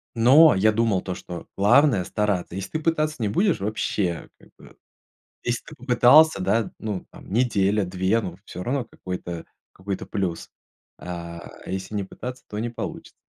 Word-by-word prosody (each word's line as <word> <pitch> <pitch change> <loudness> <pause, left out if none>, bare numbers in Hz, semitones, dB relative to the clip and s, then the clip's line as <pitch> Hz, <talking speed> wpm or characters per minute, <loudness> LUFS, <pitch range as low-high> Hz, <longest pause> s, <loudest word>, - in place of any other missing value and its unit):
Но 135 +5 +7
я 110 +3 +4
думал, 110 -4 +1
то 95 - -4
что 90 -1 -8
главное- 110 0 +5
стараться. 100 -4 -1
Если 95 - -5
ты 155 - -1
пытаться 155 -1 0
не 110 - 0
будешь, 185 - +2
вообще, 100 -4 -2
как - - -20
бы. - - -17 0.6
Если 120 0 -2
ты - - -11
попытался, 125 +3 +5
да, 105 +4 +1
ну, 105 -4 -4
там, - - -13
неделя-две, 100 -3 +1
ну - - -6
всё 90 - -7
равно 130 +3 -1
какой-то 90 -5 -6 0.3
какой-то 95 +1 -5
плюс. 90 -4 -3 0.5
А 85 -1 -7 0.2
если 95 +3 -5
не 100 - -1
пытаться, 125 +6 -8
то 105 - -5
не 120 - -2
получится. 115 - -7
105 Hz, 160 wpm, -24 LUFS, 95-125 Hz, 0.6 s, Но